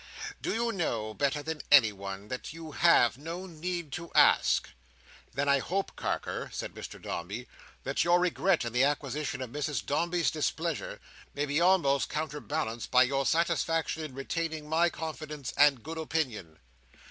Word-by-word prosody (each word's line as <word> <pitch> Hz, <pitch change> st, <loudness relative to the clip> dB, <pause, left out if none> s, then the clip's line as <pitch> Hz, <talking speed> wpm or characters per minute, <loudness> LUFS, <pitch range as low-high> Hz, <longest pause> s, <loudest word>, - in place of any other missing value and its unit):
"Do -, -, -1 dB
you 235 Hz, +1 st, 0 dB
know 115 Hz, -, -2 dB
better 145 Hz, +4 st, 0 dB
than 160 Hz, -1 st, -4 dB
anyone, 100 Hz, -7 st, +4 dB
that 130 Hz, +3 st, -5 dB
you 165 Hz, -1 st, -8 dB
have 140 Hz, -6 st, +4 dB
no 165 Hz, +5 st, -6 dB
need 170 Hz, -2 st, -4 dB
to 170 Hz, +2 st, -6 dB
ask?" -, -, +5 dB, 0.7 s
"Then 140 Hz, +2 st, 0 dB
I 140 Hz, 0 st, +4 dB
hope, 190 Hz, +8 st, -2 dB
Carker," -, -, -3 dB
said -, -, -5 dB
Mr -, -, -8 dB
Dombey, 100 Hz, +9 st, -5 dB, 0.4 s
"that 135 Hz, -, 0 dB
your 175 Hz, +1 st, +4 dB
regret 180 Hz, -3 st, +2 dB
in 120 Hz, -, -4 dB
the 125 Hz, +2 st, +4 dB
acquisition 145 Hz, -1 st, -1 dB
of 125 Hz, -, -8 dB
Mrs 145 Hz, -7 st, -2 dB
Dombey's 170 Hz, +5 st, +1 dB
displeasure, 160 Hz, +1 st, -2 dB, 0.4 s
may 145 Hz, -, 0 dB
be 145 Hz, +3 st, 0 dB
almost 170 Hz, -7 st, +3 dB
counterbalanced 150 Hz, -5 st, -3 dB
by 125 Hz, 0 st, +6 dB
your 135 Hz, +1 st, 0 dB
satisfaction 165 Hz, -1 st, +1 dB
in 145 Hz, -4 st, -7 dB
retaining 160 Hz, +2 st, -3 dB
my 165 Hz, +3 st, +3 dB
confidence 155 Hz, -4 st, -6 dB
and 140 Hz, -4 st, +5 dB
good 160 Hz, +2 st, -5 dB
opinion." 125 Hz, -, -2 dB
150 Hz, 155 wpm, -30 LUFS, 130-165 Hz, 0.7 s, by